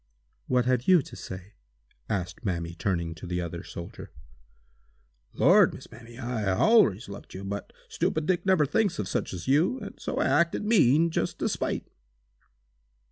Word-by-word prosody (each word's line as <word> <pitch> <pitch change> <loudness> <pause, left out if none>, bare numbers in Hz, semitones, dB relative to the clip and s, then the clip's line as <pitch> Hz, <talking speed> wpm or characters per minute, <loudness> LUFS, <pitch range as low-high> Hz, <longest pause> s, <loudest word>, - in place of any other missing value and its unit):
"What 125 -1 +2
have 125 -1 +1
you 180 -6 +6
to - - -11
say?" 95 +2 -9 0.6
asked 90 -3 -3
Mamie, 85 -4 -2
turning 85 -2 -2
to 80 +3 -10
the 90 0 -2
other 85 -1 -4
soldier. 85 0 -9 1.3
"Lord, - - +5
Miss - - -12
Mamie, 115 +1 -13
I 120 -4 -3
allers 130 - +4
loved 100 -1 -10
you, 95 - -6
but 100 +1 -5 0.2
'stupid 155 -1 -1
Dick' 180 +1 +1
never 185 -6 +3
thinks 200 +7 +1
of 105 - -3
such - - -2
as 90 -2 -7
you, 160 - +3
and 205 - -9
so - - -4
I - - +2
acted 170 +8 +2
mean 165 - +4
just - - -2
to - - -1
spite!" - - -2
120 Hz, 165 wpm, -27 LUFS, -, 1.3 s, you